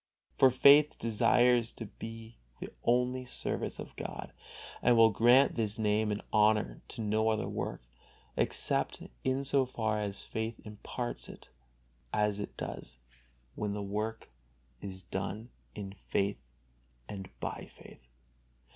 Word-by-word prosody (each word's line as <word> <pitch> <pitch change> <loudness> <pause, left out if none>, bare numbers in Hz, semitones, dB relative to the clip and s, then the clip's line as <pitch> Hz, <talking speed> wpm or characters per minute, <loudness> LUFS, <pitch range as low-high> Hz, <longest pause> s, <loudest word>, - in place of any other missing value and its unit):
For 130 - +7
faith 145 +4 +6
desires 120 +1 +3
to 115 - -7
be 115 +2 -9 0.2
the - - -7
only 125 +1 +2
service 125 - -2
of - - -8
God, - - -6 0.5
and 120 -1 +5
will 115 -1 +7
grant 120 +6 +5
this 110 -1 -1
name 105 0 +1
and 105 - -3
honor 105 - +3
to - - -6
no 110 +1 +2
other 110 -1 0
work, - - -4 0.5
except - - 0 0.2
in 130 +1 +1
so 140 0 +3
far 110 -4 -1
as 100 -1 -4
faith 110 +1 -4
imparts 105 - -5
it, - - -13 0.6
as 105 -1 +1
it 105 - -6
does 60 - -6 0.6
when 105 -1 -2
the 105 0 -3
work 105 - -3 0.5
is 95 -1 -7
done 100 +5 -4 0.3
in 100 -2 -6
faith 100 0 -1 0.7
and 95 -2 -7
by - - -4
faith. - - -15
110 Hz, 135 wpm, -32 LUFS, 105-120 Hz, 0.7 s, For